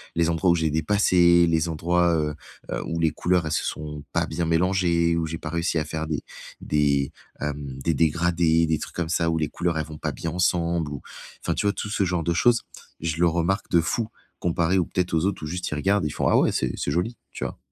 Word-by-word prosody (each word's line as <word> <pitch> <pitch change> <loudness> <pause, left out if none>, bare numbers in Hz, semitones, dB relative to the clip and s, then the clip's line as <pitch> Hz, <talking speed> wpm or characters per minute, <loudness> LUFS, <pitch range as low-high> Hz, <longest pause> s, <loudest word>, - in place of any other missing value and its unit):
les 85 0 +2
endroits 85 +2 +1
où 85 - +4
j'ai 80 -1 +1
dépassé, 85 +1 +4
les 80 0 +1
endroits, 85 +2 +2
heu 75 -1 -1 0.4
heu, - - -2
où 85 0 -3
les 80 -1 +2
couleurs, 90 -1 +1
elles 80 - -2
se - - 0
sont 75 -1 -5
pas - - +2
bien 85 +2 -2
mélangées, 85 0 +2
où 80 - 0
j'ai 80 +1 -4
pas 75 - -6
réussi 85 +1 0
à 75 - -2
faire 80 +1 -3
des 75 -2 -2 0.4
des, 70 -2 +1 0.3
hem, 70 -2 -4
des 80 +3 +1
dégradés, 85 +1 +2
des 80 -1 +1
trucs - - -7
comme 85 -2 -1
ça 85 0 +1
où 80 - 0
les 75 - 0
couleurs, 85 -2 -1
elles 80 - -1
vont 75 0 -9
pas - - -2
bien 80 - -4
ensemble 85 -3 +1
ou, 70 -4 -6 0.4
enfin, - - -1
tu - - -1
vois, 100 - +4
tout 105 - -5
ce 105 - +1
genre 90 -2 -1
de 85 - +1
choses. 115 +7 +3 0.4
Je 80 -1 -2
le 85 +1 +4
remarque 85 +4 0
de 85 - +5
fou, 110 +7 -1 0.3
comparé 85 +1 +1
aux 90 - +1
peut-être 90 +1 -2
aux 80 0 +2
autres 100 -5 -2
où - - -3
juste 90 +3 -3
ils - - -1
regardent, 100 +6 +1
et - - 0
ils - - -6
font: - - -1
«Ah - - +4
ouais, - - +3
c'est 65 -2 -1
c'est - - -2
joli». 90 +10 -1 0.2
Tu - - -5
vois? - - -5
85 Hz, 250 wpm, -25 LUFS, 80-90 Hz, 0.4 s, de